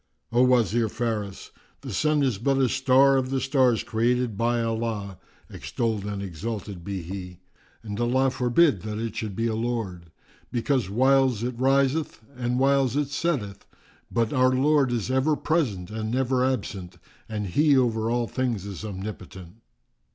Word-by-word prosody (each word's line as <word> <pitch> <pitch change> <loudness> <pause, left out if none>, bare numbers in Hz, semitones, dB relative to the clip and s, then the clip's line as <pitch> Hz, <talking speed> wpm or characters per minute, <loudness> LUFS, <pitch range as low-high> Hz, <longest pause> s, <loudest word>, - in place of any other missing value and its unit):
"O 120 +1 +3
Wazir 120 -3 +3
Faris, 105 -4 -4 0.3
the - - -6
sun 150 -1 +2
is 125 -7 0
but 135 +4 +1
a 135 -1 +3
star 135 +2 +4
of 130 -1 -1
the 135 0 0
stars 130 -4 +2
created 120 0 0
by 120 +3 +1
Allah 110 -4 -3 0.3
(extolled 110 -4 -3
and 100 -1 -4
exalted 100 +1 -6
be 95 -1 -4
He!), 90 0 -8 0.4
and 105 -1 -5
Allah 130 +3 +2
forbid 125 - +3
that 105 0 -5
it 115 -1 -4
should 105 -4 -4
be 115 - -1
a 115 - 0
Lord! 110 -7 -3 0.4
Because 125 -3 0
whiles 130 0 +3
it 125 +1 -2
riseth 135 +4 +1 0.2
and 125 0 -1
whiles 135 -1 +2
it 145 -1 0
setteth, 135 -9 -2 0.4
but 115 -2 0
our 130 0 +4
Lord 135 +1 +3
is 120 0 -2
ever 135 +4 +2
present 120 - -1
and 110 0 -3
never 130 +1 +1
absent 100 -8 -3 0.3
and 105 -2 -3
He 145 - +3
over 115 -3 +1
all 120 0 0
things 120 -7 -2
is 100 -1 -7
Omnipotent!" 95 -2 -8
120 Hz, 160 wpm, -25 LUFS, 105-130 Hz, 0.4 s, star